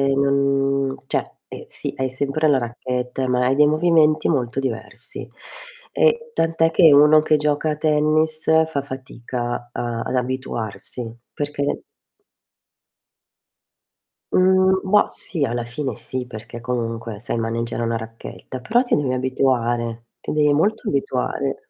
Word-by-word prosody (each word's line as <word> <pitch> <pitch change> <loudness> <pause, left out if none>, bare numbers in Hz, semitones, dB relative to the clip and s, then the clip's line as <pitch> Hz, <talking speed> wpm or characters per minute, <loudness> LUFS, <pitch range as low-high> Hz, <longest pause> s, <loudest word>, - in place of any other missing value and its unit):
non 140 -1 +1
cioè - - -2
eh, - - -9
sì - - -4
hai 130 0 -1
sempre 140 +4 0
la 140 - +4
racchetta, 125 +1 -3
ma 125 0 +2
hai 135 - +2
dei 150 +1 +6
movimenti 155 0 +3
molto 130 -4 0
diversi 125 -5 -5 0.7
e 470 0 +2
tant'è 165 0 +2
che 160 -3 +6
uno 150 +2 +7
che 155 0 +3
gioca 150 +1 +1
a - - -1
tennis 155 +1 +1 0.2
fa 145 -3 -2
fatica 120 -2 -5
a 120 -1 -3
ad - - -2
abituarsi 125 -2 -4 0.2
perché 145 -1 -2 2.5
Mhmm, 190 0 +4
bah, 210 - +5
sì 160 -6 -3
alla 120 -1 -2
fine 125 +1 -4
sì, 125 +2 -5
perché 115 0 -9
comunque 115 -2 -3
sai 120 - -3
maneggiare 115 +1 -2
una 115 0 0
racchetta, 115 +3 -8
però 235 - +2
ti 245 - +1
devi 135 -3 0
abituare, 120 -3 0
ti - - -4
devi 150 -1 +3
molto 200 +9 +1
abituare. 135 0 -2
135 Hz, 135 wpm, -21 LUFS, 120-150 Hz, 2.5 s, uno